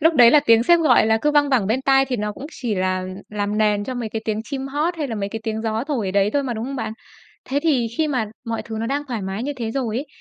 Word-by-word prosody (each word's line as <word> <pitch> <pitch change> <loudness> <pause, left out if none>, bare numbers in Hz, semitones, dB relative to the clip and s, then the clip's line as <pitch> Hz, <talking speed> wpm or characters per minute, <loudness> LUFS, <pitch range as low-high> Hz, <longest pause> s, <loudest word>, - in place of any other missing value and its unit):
Lúc 325 +2 +4
đấy 240 -4 +8
là 300 - +6
tiếng 230 -5 +5
sếp 345 +5 +5
gọi 255 -8 +5
là 220 0 +3
cứ 300 - +3
văng 290 -1 +3
vẳng 240 -8 +2
bên 245 +5 0
tai 270 0 +4
thì 255 -2 -2
nó 210 0 -2
cũng 270 +7 -8
chỉ 240 -9 -3
là 185 0 -1 0.2
làm 210 0 -2
nền 210 -1 +2
cho 260 - -4
mấy 240 -3 -3
cái 220 0 -5
tiếng 215 0 -1
chim 270 +1 -4
hót 310 +5 -1
hay 295 -4 -3
là 225 - -3
mấy 200 -2 -3
cái 225 +1 -6
tiếng 220 -1 -3
gió 225 +2 -1
thổi 250 -10 -2
ở - - -1
đấy 200 +1 +2
thôi 285 - +1
mà, 255 -3 -3
đúng 220 - -4
không 275 +2 -5
bạn? 220 -3 -3 0.5
Thế 280 +2 -1
thì 270 -8 +2
khi 310 -1 +2
mà 250 -6 0 0.2
mọi 230 0 -2
thứ 225 - -7
nó 230 - -2
đang 285 +3 -1
thoải 225 -5 -3
mái 190 +4 -4
như 290 +2 -2
thế 230 -2 -3
rồi 235 -3 -2
ấy, 285 +4 -3
235 Hz, 310 wpm, -21 LUFS, 215-275 Hz, 0.5 s, đấy